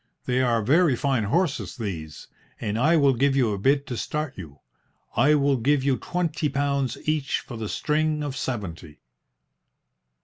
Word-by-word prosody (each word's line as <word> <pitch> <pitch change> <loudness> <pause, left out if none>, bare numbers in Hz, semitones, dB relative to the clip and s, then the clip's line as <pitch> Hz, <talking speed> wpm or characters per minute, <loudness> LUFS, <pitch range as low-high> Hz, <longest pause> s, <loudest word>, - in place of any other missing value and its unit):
"They 125 0 +1
are 120 -3 +1
very 150 - +4
fine 130 -3 0
horses, 160 - -1
these, 80 -9 -6 0.3
and 105 -1 -2
I 160 +6 +4
will 140 -3 +4
give 135 +3 +2
you 120 -6 +2
a 100 - -4
bid 140 +6 +2
to 125 - -5
start 150 +3 -3
you. 80 -7 -10 0.6
I 145 +6 +4
will 140 -2 +2
give 135 +3 +2
you 135 -2 +2
twenty 160 -4 -2
pounds 140 -2 -1
each 150 -3 0
for 120 - -9
the 110 -2 -5
string 155 0 0
of 145 -2 -4
seventy." 85 - -5
135 Hz, 165 wpm, -25 LUFS, 115-150 Hz, 0.6 s, very